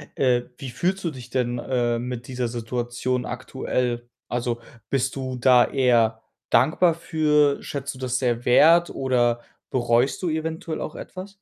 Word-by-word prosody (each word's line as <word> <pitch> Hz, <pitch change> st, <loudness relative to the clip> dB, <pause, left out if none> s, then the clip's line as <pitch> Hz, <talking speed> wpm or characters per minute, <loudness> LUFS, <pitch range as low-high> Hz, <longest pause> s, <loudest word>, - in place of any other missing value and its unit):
äh, 125 Hz, -2 st, +3 dB, 0.2 s
wie 130 Hz, -3 st, -7 dB
fühlst 185 Hz, +9 st, -1 dB
du 165 Hz, -, -1 dB
dich 125 Hz, -3 st, -10 dB
denn, 120 Hz, -1 st, -1 dB
äh, 120 Hz, -2 st, 0 dB
mit 125 Hz, -1 st, -5 dB
dieser 125 Hz, -2 st, -2 dB
Situation 120 Hz, +2 st, -2 dB
aktuell? 125 Hz, -1 st, -3 dB, 0.2 s
Also, 120 Hz, -1 st, -2 dB, 0.3 s
bist 130 Hz, -1 st, 0 dB
du 130 Hz, -1 st, -4 dB
da 125 Hz, 0 st, +5 dB
eher 115 Hz, -4 st, +2 dB, 0.3 s
dankbar 160 Hz, +7 st, +4 dB
für? 150 Hz, -4 st, +2 dB
Schätzt 140 Hz, -1 st, -5 dB
du 130 Hz, -, -13 dB
das 130 Hz, -1 st, -1 dB
sehr 120 Hz, -2 st, 0 dB
wert, 165 Hz, +7 st, +6 dB
oder 120 Hz, -3 st, +1 dB, 0.3 s
bereust 120 Hz, +3 st, +1 dB
du 175 Hz, -, +1 dB
eventuell 160 Hz, 0 st, -3 dB
auch -, -, -5 dB
etwas? 190 Hz, +2 st, -8 dB
125 Hz, 150 wpm, -24 LUFS, 120-140 Hz, 0.3 s, wert